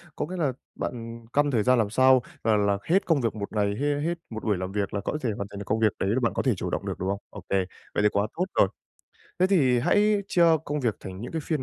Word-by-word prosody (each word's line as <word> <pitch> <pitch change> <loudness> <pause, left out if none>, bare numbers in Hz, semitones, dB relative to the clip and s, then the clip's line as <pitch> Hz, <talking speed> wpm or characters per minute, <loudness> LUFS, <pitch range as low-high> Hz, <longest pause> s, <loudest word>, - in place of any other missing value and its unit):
có - - -2
nghĩa 185 +4 -6
là 145 -6 +1 0.2
bạn 115 -1 -6
căn 145 0 +3
thời 115 -5 +2
gian 125 +2 +4
làm 110 -3 +1
sao 130 +3 +5 0.2
là 110 -1 +3
làm 100 -1 +1
hết 185 +4 +2
công 160 -5 +2
việc 115 -3 -1
một 100 -1 -5
ngày, 100 -1 0
hê 145 0 +1
hết 165 +3 0 0.2
một 110 -1 -6
buổi 105 -3 +1
làm 95 +1 -4
việc 100 -1 -2
là 100 - -1
có 130 - -2
thể 125 - 0
hoàn 100 - -4
thành 100 - -7
được 100 - -6
công 110 +3 0
việc 110 -2 +4
đấy 95 - 0
là 115 +5 +2
bạn 115 - +1
có - - 0
thể 130 - +3
chủ - - -4
động - - -3
được, - - -4
đúng 95 - -2
không? 100 0 -1
Ô - - -9
kê. 95 -1 +2 0.3
Vậy 105 - +1
thì 105 - +5
quá 100 +1 0
tốt 180 - 0
rồi. - - +6 0.7
Thế 185 - +4
thì 140 -11 +3
hãy 205 - +3
chia 175 - +4 0.2
công 150 0 -2
việc 115 -5 0
thành 95 0 -8
những 120 - -6
cái 165 - -2
phiên 155 -5 -1
115 Hz, 295 wpm, -26 LUFS, 100-145 Hz, 0.7 s, rồi